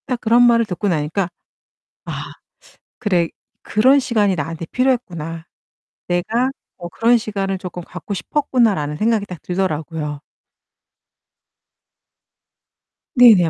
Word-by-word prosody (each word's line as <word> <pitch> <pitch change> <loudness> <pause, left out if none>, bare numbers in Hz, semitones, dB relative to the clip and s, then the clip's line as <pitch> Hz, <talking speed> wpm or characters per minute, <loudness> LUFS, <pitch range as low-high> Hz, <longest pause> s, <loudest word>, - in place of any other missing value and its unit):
딱 250 -3 -1
그런 235 +1 +5
말을 230 -1 +4
듣고 200 0 -3
나니까 165 +2 0 0.8
'아 - - -5 0.7
그래 180 -7 +1 0.3
그런 260 +7 +4
시간이 215 -7 +2
나한테 165 +1 -4
필요했구나. 170 -11 -1 0.6
내가 225 +9 +1 0.3
어 175 -1 -7
그런 230 +7 +3
시간을 195 -3 -2
쪼끔 180 -1 -7
갖고 180 +4 -7
싶었구나.'라는 210 - +1
생각이 220 0 +1
딱 180 -5 -9
들더라고요. 160 -5 -2 3.0
네네. 220 -9 +7
195 Hz, 245 characters per minute, -20 LUFS, 170-230 Hz, 3.0 s, 네네